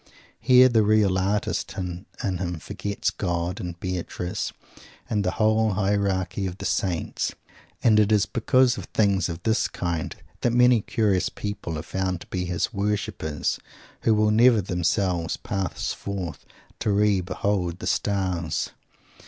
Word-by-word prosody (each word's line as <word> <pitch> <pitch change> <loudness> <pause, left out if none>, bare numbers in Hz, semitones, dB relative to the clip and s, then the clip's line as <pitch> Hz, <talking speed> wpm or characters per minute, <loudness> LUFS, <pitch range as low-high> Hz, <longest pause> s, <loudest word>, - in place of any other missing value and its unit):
Here 125 +1 +7
the 115 -3 +3
real 105 -2 +3
artist 100 +3 -1
in 90 0 -4 0.2
him 90 -3 -2
forgets 100 +5 -3
God 85 0 -2
and 85 -1 -6
Beatrice 90 -1 -3 0.6
and 105 -2 0
the 90 - +1
whole 110 0 +3
hierarchy 95 -1 0
of 90 0 -6
the 100 - -6
saints. 90 -4 -1 0.5
And 110 -2 +5
it 105 0 +3
is 105 -1 +4
because 125 +2 +2
of - - -7
things 100 -5 +1
of 85 +1 -6
this 110 +1 +2
kind 85 -3 -3 0.3
that 120 - +1
many 125 -1 +5
curious 100 -4 +1
people 100 -6 -5
are 75 - -5
found 90 +1 -2
to - - -11
be 90 -1 -1
his 90 +5 -1
worshipers 100 -7 -1 0.4
who 110 - +3
will 105 0 +3
never 115 +1 +6
themselves 90 -2 0
pass 95 -4 -3
forth 95 -4 -5 0.3
"to - - -1
re 100 -1 +3
behold 90 -1 -1
the - - -7
stars." 95 -5 -1
100 Hz, 145 wpm, -25 LUFS, 90-105 Hz, 0.6 s, Here